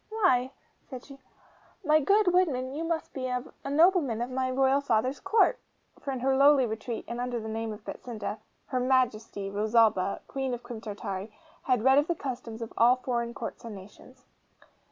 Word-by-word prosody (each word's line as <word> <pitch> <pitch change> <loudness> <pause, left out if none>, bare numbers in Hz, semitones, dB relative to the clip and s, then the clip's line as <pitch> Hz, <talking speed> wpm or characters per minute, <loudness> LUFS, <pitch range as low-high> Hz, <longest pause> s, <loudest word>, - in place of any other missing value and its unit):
'Why,' 360 - +2 0.4
said 255 -3 -8
she, 275 -1 -13 0.7
'my 305 0 +5
good 395 +3 +3
woodman, 270 -8 +1
you 310 +3 -3
must 330 -1 -3
be 260 -1 -3
a 250 -1 -2 0.3
nobleman 305 - +3
of 240 +2 -3
my 260 0 -1
royal 265 +2 +2
father's 255 +1 0
Court!' 445 +5 +3 0.4
For - - -7
in 260 -2 -4
her 265 +1 +2
lowly 275 -1 +6
retreat, 225 +1 -5
and 235 +1 -4
under 245 -1 -2
the 220 - -7
name 225 0 -3
of 210 0 -10
Betsinda, 215 -3 -6 0.3
HER 255 - -2
MAJESTY, 230 -6 0
ROSALBA, 210 -2 +2
Queen 265 -2 -2
of 240 - -12
Crim 235 -3 -8
Tartary, 205 -1 -5 0.3
had 250 -4 +2
read 265 +2 +6
of 295 - 0
the 345 - 0
customs 240 -5 -6
of 230 - -9
all 240 +2 +6
foreign 235 -2 -3
courts - - -6
and 230 -3 -7
nations. 230 +7 -15
250 Hz, 180 wpm, -28 LUFS, 225-275 Hz, 0.7 s, lowly